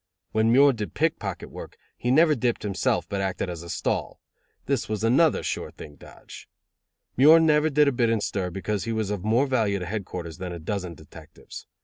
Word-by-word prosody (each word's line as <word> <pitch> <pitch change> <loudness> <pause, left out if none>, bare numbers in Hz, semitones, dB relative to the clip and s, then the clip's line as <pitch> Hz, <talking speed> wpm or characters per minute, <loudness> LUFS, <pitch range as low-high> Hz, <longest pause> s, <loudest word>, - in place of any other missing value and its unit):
When 110 +1 +2
Muir 140 +3 +6
did 105 -7 -6
pickpocket - - -2
work, - - -10 0.2
he 120 - -3
never 155 +4 +5
dipped 120 -3 -1
himself, 95 -4 -1
but 100 +2 -3
acted 95 -1 -2
as 85 -2 -7
a 85 - -10
stall. - - -2 0.5
This 135 -5 -1
was 110 -1 -3
another 135 +8 +3
sure - - -3
thing 75 - -12
dodge. - - -14 0.7
Muir 155 +6 +8
never 155 -1 +3
did 150 0 +3
a - - +4
bit 120 -2 +1
in 115 -1 +1
stir 95 -2 -2
because 95 +2 -3
he 115 - -3
was 110 -2 -2
of 100 -3 -4
more 115 +6 +2
value 110 -7 0
to 90 - -5
headquarters 90 -4 -6
than 90 -1 -5
a - - -6
dozen 90 +1 -4
detectives. 75 -1 -13
110 Hz, 200 wpm, -25 LUFS, 95-130 Hz, 0.7 s, Muir